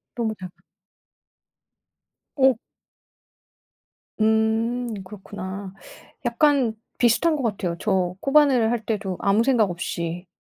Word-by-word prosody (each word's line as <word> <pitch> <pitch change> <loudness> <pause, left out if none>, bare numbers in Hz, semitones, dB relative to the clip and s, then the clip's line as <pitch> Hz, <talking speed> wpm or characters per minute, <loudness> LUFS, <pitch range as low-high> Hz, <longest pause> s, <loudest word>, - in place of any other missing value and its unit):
너무 225 -2 -1
작아. 185 -1 -9 1.8
어. 265 -2 +5 1.7
음 220 +2 +1
그렇구나. 190 0 -8 0.5
약간 245 -1 +2 0.2
비슷한 280 +7 +3
것 285 - -3
같아요. 195 -7 -2
저 185 -4 0
코바늘 275 -5 +4
할 235 -2 -2
때도 205 -4 -2
아무 200 +3 +3
생각 235 -7 +3
없이. 170 0 -4
220 Hz, 185 characters per minute, -24 LUFS, 190-245 Hz, 1.8 s, 어